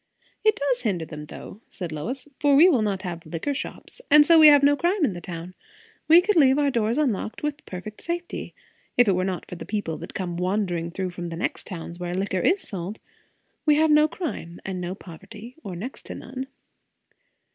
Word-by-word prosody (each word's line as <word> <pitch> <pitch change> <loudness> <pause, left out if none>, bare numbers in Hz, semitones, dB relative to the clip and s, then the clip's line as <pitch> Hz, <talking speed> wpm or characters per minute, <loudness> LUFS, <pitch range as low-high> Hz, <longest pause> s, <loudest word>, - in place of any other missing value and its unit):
"It 435 -1 +4
does 275 -3 0
hinder 185 -8 -1
them, 150 -1 -9
though," 200 +6 -10
said 175 -5 -6
Lois; 250 - -5
"for 285 -1 +4
we 320 +6 +8
will 275 -11 +4
not 200 -2 -1
have 170 -3 -5
liquor 165 - -3
shops. 305 - -7
And 295 0 +8
so, 330 +1 +7
we 310 - +10
have 290 -1 +7
no 285 +1 +6
crime 345 +2 +1
in 210 - -1
the 175 - -7
town. 170 0 -7 0.5
We 330 +3 +8
could 410 +3 +1
leave 270 -3 +6
our 290 -1 +2
doors 230 0 0
unlocked, 245 -6 -1
with 295 0 -3
perfect 190 +4 -8
safety, 345 +1 -5 0.4
if 245 -2 +6
it - - +5
were 185 0 0
not 185 -1 -3
for 180 - -8
the - - -7
people 205 -7 -3
that - - -9
come 175 -3 -3
wandering 180 -2 -1
through 185 +1 -3
from 175 -1 -6
the 165 - -5
next 175 - -3
towns, 170 -2 -7
where 175 0 -3
liquor 190 0 -1
is 380 - +2
sold. 195 +1 -5 0.6
We 300 -1 +4
have 310 +1 +4
no 300 +1 +6
crime, 305 - -6
and 185 -2 -4
no 180 +1 -4
poverty; 210 +7 -11
or 185 - -6
next 230 +10 -7
to - - -6
none." 260 +1 -7
215 Hz, 210 wpm, -25 LUFS, 180-290 Hz, 0.6 s, we